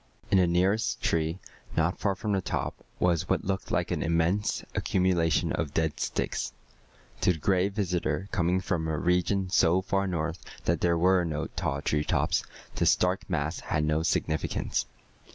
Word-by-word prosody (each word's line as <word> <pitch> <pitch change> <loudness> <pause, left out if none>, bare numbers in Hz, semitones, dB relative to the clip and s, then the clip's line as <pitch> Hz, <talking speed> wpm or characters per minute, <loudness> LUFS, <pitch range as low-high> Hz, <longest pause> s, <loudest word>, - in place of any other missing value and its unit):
In 95 - +6
the 90 - +4
nearest 95 +6 +1
tree, 80 +1 +1 0.4
not 80 +3 +1
far 100 -2 +1
from 105 - -3
the 95 -1 +1
top, - - -2 0.3
was 85 -1 +1
what - - +1
looked 95 0 -2
like - - 0
an - - -1
immense 85 +5 +1
accumulation 90 -4 +1
of 75 -3 -2
dead 80 -2 0
sticks. - - -2 0.7
To 90 - +3
the - - -7
Gray 95 +4 +2
Visitor, 90 -4 -1
coming 90 -2 +1
from 85 -4 -1
a 80 -1 -1
region 90 +2 +1
so 90 -2 +4
far 95 0 0
north 85 -1 -2 0.3
that - - +1
there 85 -1 +3
were 90 +1 +4
no 80 -2 -2
tall - - -2
treetops, 75 0 +1 0.3
this - - +4
dark 90 +2 -1
mass 80 -1 -1
had 75 - -1
no 75 +1 +1
significance. 80 -1 -1
90 Hz, 165 wpm, -28 LUFS, 80-95 Hz, 0.7 s, In